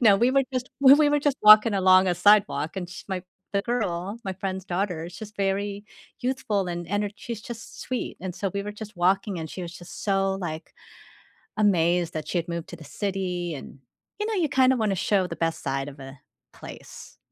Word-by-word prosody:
No, 215 -5 +6
we 240 +5 +3
were 275 +1 +4
just 255 0 -3
we 285 +2 +7
were 290 0 +3
just 285 -2 +1
walking 215 0 +8
along 185 0 +5
a 180 - +2
sidewalk, 195 -4 +3
and 180 -2 -4
sh - - -9
my 185 -2 -3 0.3
the 200 0 +1
girl, 205 -3 -2
my 190 - -2
friend's 190 0 -4
daughter, 175 -3 -2
she's 210 +4 -9
very 200 +1 -1 0.4
youthful 245 -6 -1
and 175 0 -4
ener 205 +2 -1
she's 230 -3 -6
just 230 -2 -9
sweet, 255 -1 -4
and 185 -1 -5
so 195 -1 -2
we 200 - -1
were 210 - -5
just 210 -1 -10
walking, 190 +1 +1
and 160 -1 -5
she 185 - -6
was 170 - -6
just 175 - -10
so 195 -1 +1
like, 160 -4 -6 0.8
amazed 175 -4 +2
that 155 -1 -4
she 180 - -1
had 170 - -2
moved 170 -1 -5
to - - -7
the 160 - -12
city, 180 -1 -3
and, 140 - -10 0.4
you 420 - -1
know, 440 - -1
you 345 -4 +2
kind 260 0 +4
of 250 - -1
wanna 210 -3 +1
show 190 0 +1
the - - -6
best 165 -1 -1
side 135 0 -2
of 140 0 -14
a 135 +1 -10 0.4
place, - - -11
195 Hz, 210 wpm, -25 LUFS, 175-215 Hz, 0.8 s, walking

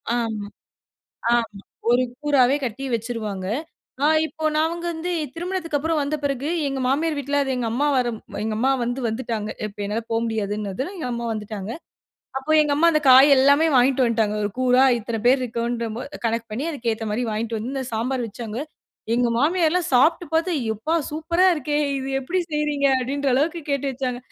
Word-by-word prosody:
ஆமா, 220 -3 -2 0.9
ஆமா 225 -4 -1 0.3
1 245 +1 +4 0.2
கூறாவே 280 -2 +4
கட்டி 255 +3 -4
வச்சிருவாங்க. 215 -5 -3 0.6
அ - - +5 0.2
இப்போ 315 0 -8
நாவகந்து 340 +2 -1 0.2
திருமணத்துக்கு 340 -3 -2
அப்புறம் 320 +1 0
வந்த 285 +2 -1
பெறகு, 280 +1 -1 0.2
எங்க 270 -1 -3
மாமியார் 300 +3 +1
வீட்ல 285 +1 0
அது 270 - -2
எங்க 240 -2 -1
அம்மா 285 +5 +1
வரம் 240 -3 0 0.2
எங்க 220 -1 -2
அம்மா 260 +4 +2
வந்து 245 +2 -2
வந்துட்டாங்க. 220 -2 -3 0.2
இப்ப 205 0 -9
என்னால 215 +3 -2
போ 225 - +2
முடியாதுன்னதுல 215 - -3
எங்க 315 - -4
அம்மா 235 0 -3
வந்துட்டாங்க. 210 -1 -5 0.7
அப்போ 290 +4 -2
எங்க 295 - 0
அம்மா 335 +3 +5
அந்த 305 - +3
காய் 265 +3 +8
எல்லாமே 280 +4 +5
வாய்ன்ட்டு 255 +1 +4
வந்ட்டாங்க. 220 -2 +1
1 205 - -1
கூறா 255 0 +4 0.2
இத்தன 225 0 -4
பேர் 260 +1 +5
இருக்கோம்ன்ற 235 0 -2 0.4
கணக்கு 230 0 0
பண்ணி 240 +8 -3
அதுக்கு 240 -6 -2
ஏத்த 220 0 -5
மாதிரி 245 +3 -1
வாங்கிட்டு 225 +1 -2
வந்து 250 +6 -5
அந்த 265 -1 -2
சாம்பார் 240 +2 -1
வச்சாங்க. 225 +1 -6 0.6
எங்க 245 0 +2
மாமியார்லாம் 335 +4 +2
சாப்டு 325 +8 +4
பாத்து, 330 +3 +2 0.2
யப்பா, 220 +10 -1 0.2
சூப்பரா 320 +4 +1
இருக்கே! 295 0 -2 0.2
இது 265 0 -4
எப்டி 335 +8 -2
செய்றீங்க? 295 -2 +1
அப்டின்ற 275 +2 -1
அளவுக்கு 325 +5 +1
கேட்டு 280 0 0
வச்சாங்க 250 -1 -3
255 Hz, 170 wpm, -23 LUFS, 230-295 Hz, 0.9 s, காய்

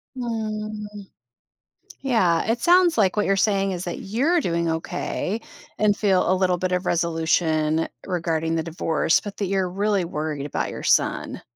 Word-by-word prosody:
Mm. 215 -3 -5 0.9
Yeah. 190 -11 +2
It 235 +1 +1
sounds 350 -2 +4
like 200 -1 +2
what 210 - +2
you're 195 - +2
saying 195 -1 +1
is 180 0 -4
that 175 - -4
you're 275 - +1
doing 170 -1 0
okay, 185 +6 -3 0.4
and 210 -1 +3
feel 190 -3 +2
a - - +4
little 185 -1 +1
bit 185 +1 -2
of 180 0 0
resolution 160 -1 +1 0.2
regarding 165 -3 -1
the 160 - 0
divorce, 165 -1 +1
but 205 -1 -8
that 200 - -1
you're 190 -1 0
really 200 -1 0
worried 150 -3 -4
about 145 - -2
your - - -7
son. - - +1
185 Hz, 160 wpm, -23 LUFS, 165-210 Hz, 0.9 s, sounds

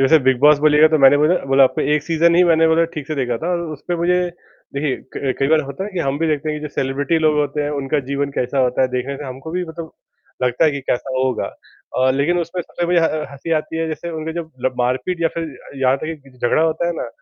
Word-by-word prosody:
जैसे 135 +4 +5
big 130 -2 +4
boss 150 0 +6
बोलिएगा 150 0 +6
तो 155 - +2
मैंने 135 0 +7
बोला 155 +4 +4 0.2
बोला 135 0 +6
आपको - - 0
एक 150 0 +2
सीज़न 170 +1 +2
ही 180 - +6
मैंने 165 -1 +4
मतलब 165 +1 +4
ठीक 150 -3 -5
से 155 - -3
देखा 125 -4 -1
था 170 - -1
और 170 - 0
उसपे 165 +4 -4
मुझे 175 +2 +2 0.6
देखिए 140 -1 -1 0.2
क 135 -2 -1
कई 135 - +1
बार 155 0 +4
होता 190 +8 -5
है 210 - -6
कि 185 - -4
हम 140 -2 -1
भी 165 - 0
देखते 155 0 -1
हैं 150 - -3
कि - - -11
जो - - -7
सेलिब्रिटी 140 +5 0
लोग 155 -1 +2
होते 145 0 0
हैं 145 - -2
उनका 145 0 -1
जीवन 140 0 -1
कैसा 125 +2 -1
होता 125 0 +2
है, 130 - +2
देखने 130 +2 -3
का 140 - -7
हमको 135 +5 -8
भी 180 +1 -2
मतलब 160 0 -7 0.5
लगता 125 +5 +2
है 155 - +4
कि 140 -1 -4
कैसा 130 +2 -1
होगा 130 -1 0 0.5
अ, 130 0 +4
लेकिन 145 +7 +1
उसमें 170 +1 -3
सबसे 175 +1 -4
मुझे 175 -1 +3
ह 165 - +3 0.2
हँसी 140 +4 -5
आती 155 +1 -2
है 165 - -1
जैसे 170 +2 -5
उनके 160 0 -4
जब 170 0 -4
मतलब 130 -4 -4
मारपीट 130 +8 -1
या 165 - +3
फिर 165 -1 -2 0.4
यहाँ 130 0 +3
तक 155 +2 -6
कि 135 - -16
झगड़ा 120 +6 +2
होता 160 +1 0
है 175 - 0
ना - - -4
150 Hz, 265 wpm, -19 LUFS, 135-165 Hz, 0.6 s, मैंने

